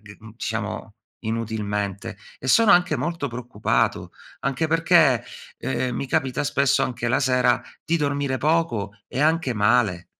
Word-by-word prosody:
di 100 -1 -14
mhmm, 110 - -12
diciamo 110 -2 -4 0.3
inutilmente. 105 -3 -3 0.2
E 130 - -6
sono 225 - +6
anche 175 -3 +3
molto 155 +2 -3
preoccupato, 120 -3 -1 0.3
anche 135 +4 -1
perché, 165 -6 +4 0.4
ehm, 120 - -2
mi - - -3
capita 130 +2 0
spesso 140 -2 +2
anche 120 -1 -2
la 125 +3 +2
sera 125 -1 +2 0.2
di 170 - +1
dormire 140 -2 -1
poco 145 - 0 0.2
e 130 - -3
anche 155 -2 +2
male. 105 -4 +2
125 Hz, 140 wpm, -23 LUFS, 110-145 Hz, 0.4 s, sono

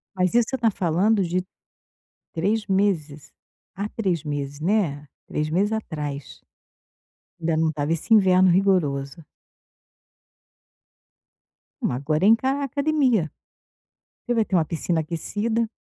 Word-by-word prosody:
Mas 185 -1 +1
isso 240 -1 +3
você 265 - -2
tá 230 -2 +2
falando 190 +4 +1
de 180 +1 -1 0.9
3 205 +6 0
meses, 180 -7 -1 0.4
à 200 +2 -3
3 185 -8 -2
meses, 145 -1 -4
né, 165 -6 0 0.2
3 150 0 -2
meses 200 +6 +1
atrás 150 - -5 1.0
ainda 165 -1 0
não 160 0 +2
estava 150 0 -2
esse 165 +7 +2
inverno 185 -3 +5
rigoroso. 165 -6 +1 2.6
Ma 180 - 0
agora 155 +6 0
é - - +6
encarar 260 +6 +3
a - - -1
academia. 275 - +1 0.9
Você 240 - -1
vai 225 -2 +2
ter 190 - -1
uma 165 -3 +3
piscina 165 0 -1
aquecida 210 +8 -2
180 Hz, 125 wpm, -24 LUFS, 155-220 Hz, 2.6 s, é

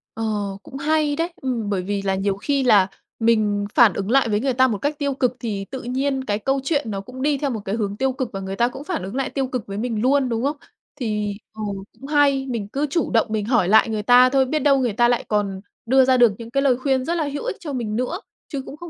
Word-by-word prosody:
Ờ, 225 - -4 0.4
cũng 270 - -9
hay 300 +1 +1
đấy. 335 +3 -2
Ừm, 240 -6 -2
bởi 195 -3 0
vì 200 +1 -2
là 195 -1 0
nhiều 195 0 0
khi 280 +5 0
là 205 -6 +5 0.3
mình 215 -3 +2
phản 230 -6 +6
ứng 200 +3 -3
lại 270 -3 +4
với 210 -1 +1
người 265 +2 0
ta 260 +1 +4
một 220 - -1
cách 290 +7 -2
tiêu 280 -1 0
cực, 250 -2 0
thì 205 -5 -3
tự 265 - -5
nhiên 265 +2 -1
cái 205 -4 -1
câu 270 +5 0
chuyện 280 -5 -1
nó 195 -1 -3
cũng 255 +6 -10
đi 290 0 +2
theo 280 0 -1
một 225 -4 -3
cái 195 - -1
hướng 205 -2 -2
tiêu 265 0 0
cực, 260 -2 -4
và 195 - -4
người 195 0 -5
ta 235 +3 +2
cũng 265 +3 -8
phản 335 - -3
ứng 195 +5 -6
lại 270 -1 -1
tiêu 270 -2 -2
cực 250 -4 -4
với 195 - -5
mình 225 -1 -2
luôn, 265 +1 +2
đúng 230 +1 -1
không? 290 +2 -1 0.4
Thì 210 -5 -2 0.2
ừ, 220 - -8 0.4
cũng 275 - -9
hay, 285 -2 +3
mình 225 -5 -3
cứ 280 +7 -2
chủ 335 +3 -1
động 225 -2 +3
mình 210 -2 -1
hỏi 225 -7 +2
lại 220 +3 +5
người 215 -1 -2
ta 250 +3 +6
thôi, 265 0 +3
biết 305 +4 -1
đâu 280 -2 +3
người 245 -5 0
ta 240 +2 +3
lại 240 -1 +1
còn 200 -2 -1 0.2
đưa 260 +2 +5
ra 260 -1 +4
được 240 -3 +6
những 230 -1 -9
cái 275 +2 +1
lời 260 -3 +3
khuyên 260 0 0
rất 340 - -1
là 325 - 0
hữu 290 - -4
ích - - -2
cho 295 -5 -6
mình 220 -4 -3
nữa, 255 - -2 0.3
chứ 280 -3 -4
cũng 285 - -9
không 345 +2 -9
250 Hz, 280 wpm, -22 LUFS, 210-275 Hz, 0.4 s, phản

